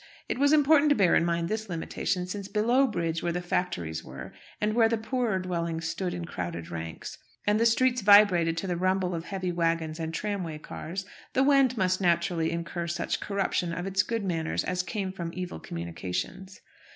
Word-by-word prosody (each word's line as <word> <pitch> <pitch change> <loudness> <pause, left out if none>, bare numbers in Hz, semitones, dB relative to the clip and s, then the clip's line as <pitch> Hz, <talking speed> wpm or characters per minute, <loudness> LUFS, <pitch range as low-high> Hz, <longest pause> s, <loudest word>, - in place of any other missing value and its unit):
It - - -2
was 285 +1 +4
important 300 0 +5
to 290 - +5
bear 190 -7 +4
in - - +4
mind 170 0 0
this 215 +1 -3
limitation, 180 +2 -2
since 195 +1 -5
below 235 +7 +3
bridge, 165 -6 -2
where 175 - 0
the 175 - -1
factories 90 - -2
were, 65 0 -9 0.3
and 210 0 +1
where 225 -1 +4
the 230 - +1
poorer 225 -2 -1
dwellings 170 -3 -2
stood 180 +2 -2
in 175 -1 -4
crowded 85 - -5
ranks, 80 -1 -6 0.3
and 210 +1 +3
the 230 - +5
streets 250 +1 +2
vibrated 195 -5 +6
to 165 - -2
the 180 -2 -1
rumble 185 0 +1
of 165 0 -4
heavy 185 -2 -3
waggons 165 -2 0
and 160 0 -3
tramway 180 -3 -3
cars, 175 +5 -6 0.3
the 265 - +3
Wend 270 -3 +4
must 185 -1 +1
naturally 170 -2 +2
incur 170 +1 -3
such 170 0 -2
corruption 195 -3 -1
of 180 +2 -4
its 195 0 +2
good 225 +1 -2
manners 165 -3 -1
as 180 0 -1
came 190 0 -3
from 175 -3 -5
evil 180 - -5
communications. 90 - -5
180 Hz, 190 wpm, -28 LUFS, 165-210 Hz, 0.3 s, vibrated